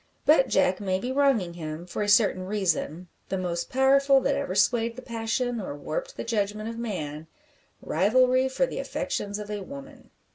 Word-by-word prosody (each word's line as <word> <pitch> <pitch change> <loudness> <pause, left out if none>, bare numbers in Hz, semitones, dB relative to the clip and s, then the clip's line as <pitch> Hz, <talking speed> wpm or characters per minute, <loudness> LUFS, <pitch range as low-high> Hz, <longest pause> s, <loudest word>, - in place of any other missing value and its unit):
But 290 -3 +5
Jack 185 0 +2
may 190 -2 0
be 245 +7 -4
wronging 260 -10 +2
him, 160 0 -6
for 180 - -5
a 205 - 0
certain 200 -3 +3
reason 180 -4 -1 0.2
the 190 - -1
most 175 -2 -3
powerful 275 +1 +4
that 280 - +1
ever 280 0 -2
swayed 230 -1 +2
the 255 - -9
passion 235 +1 -2
or 165 - -5
warped - - -5
the - - -3
judgment 215 -1 -2
of 230 0 -6
man 160 -9 -5 0.6
rivalry 255 +8 +3
for 380 - +1
the - - -5
affections 205 0 -3
of 210 0 -7
a 205 -1 -3
woman. 275 +4 -11
220 Hz, 180 wpm, -26 LUFS, 185-260 Hz, 0.6 s, But